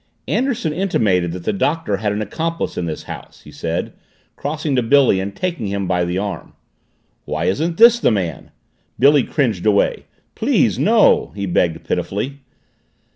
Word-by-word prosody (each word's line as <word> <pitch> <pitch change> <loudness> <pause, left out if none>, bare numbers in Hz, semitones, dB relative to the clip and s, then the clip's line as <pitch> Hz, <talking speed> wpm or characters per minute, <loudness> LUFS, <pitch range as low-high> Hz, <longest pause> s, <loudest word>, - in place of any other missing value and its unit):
"Anderson 240 - 0
intimated 105 - +1
that 90 0 -7
the - - -1
Doctor 165 - 0
had 105 0 -1
an 105 +1 -2
accomplice 165 +10 -3
in 85 - -3
this 80 - -5
house," - - -10
he - - -14
said, - - -3 0.4
crossing 150 -1 -2
to 125 - +3
Billy 125 -4 +4
and 100 +1 -4
taking 170 - -3
him 100 -1 -2
by 90 -1 +1
the 90 +1 -2
arm. 95 -3 -5 0.7
"Why 80 +2 -2
isn't 160 - 0
this 235 +1 +7
the - - +3
man?" 95 -8 -2 0.5
Billy 140 +2 +5
cringed 115 - -1
away. 100 -1 +2 0.3
"Please, - - +1
no," - - +4
he 100 -1 -3
begged 85 -2 0
pitifully. 130 +8 -2
105 Hz, 160 wpm, -19 LUFS, 95-155 Hz, 0.7 s, this